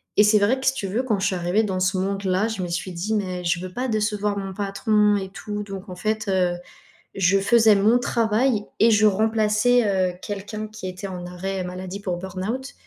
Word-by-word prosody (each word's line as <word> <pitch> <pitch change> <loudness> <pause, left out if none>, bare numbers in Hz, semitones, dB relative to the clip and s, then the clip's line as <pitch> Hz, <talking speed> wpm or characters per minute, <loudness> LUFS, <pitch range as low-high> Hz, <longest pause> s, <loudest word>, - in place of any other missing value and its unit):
et 210 - +6
c'est 210 0 +5
vrai 210 +6 +2
que 260 - -6
si 265 - +4
tu 210 -7 -4
veux, 220 +7 -1
quand 220 -6 0
je 190 - 0
suis 195 - -1
arrivée 180 +5 +1
dans 190 -3 -2
ce 185 +1 +1
monde-là, 195 +1 0
je 220 -4 -4
me 175 - -4
suis 175 +2 -3
dit: 180 +6 -2
«Mais 185 -4 -2
je 175 +1 0
veux 185 0 -7
pas 255 +4 -2
décevoir 210 -2 0
mon 195 -1 -4
patron» 205 +1 +2
et 190 - -4
tout 210 +1 -5
donc, 195 -1 -8
en 180 - -7
fait, 215 +1 -2
heu, 180 -2 +2 0.6
je 195 +1 +3
faisais 220 +1 +5
mon 210 +4 +4
travail 230 -1 +1 0.2
et 230 - +6
je 215 0 +4
remplaçais, 220 +3 +3 0.2
heu, - - -12
quelqu'un 210 +1 -5
qui 215 -3 -8
était 185 +2 -7
en 180 -2 -6
arrêt 185 +2 -4
maladie 185 +2 -6
pour 180 -3 -2
burn-out, 195 +9 -5
200 Hz, 220 wpm, -23 LUFS, 185-215 Hz, 0.6 s, et